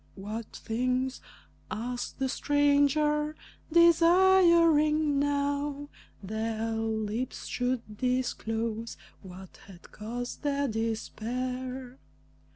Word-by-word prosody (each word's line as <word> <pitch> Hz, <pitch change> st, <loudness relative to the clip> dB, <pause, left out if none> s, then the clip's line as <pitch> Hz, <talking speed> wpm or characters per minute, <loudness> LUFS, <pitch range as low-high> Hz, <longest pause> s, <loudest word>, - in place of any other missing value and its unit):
"What 210 Hz, +3 st, -6 dB
things?" 255 Hz, +3 st, -1 dB, 0.5 s
asked 245 Hz, +2 st, -4 dB
the 270 Hz, -, 0 dB
stranger, 290 Hz, +2 st, +2 dB, 0.4 s
desiring 335 Hz, -3 st, +5 dB
now 285 Hz, 0 st, -1 dB, 0.3 s
Their 220 Hz, +2 st, -2 dB
lips 225 Hz, +2 st, -3 dB
should 245 Hz, -4 st, -3 dB
disclose 230 Hz, -3 st, -2 dB, 0.2 s
what 185 Hz, -1 st, -12 dB
had 180 Hz, -3 st, -15 dB
caused 240 Hz, +3 st, -6 dB
their 285 Hz, -1 st, 0 dB
despair. 250 Hz, +3 st, -4 dB
255 Hz, 75 wpm, -29 LUFS, 225-290 Hz, 0.5 s, desiring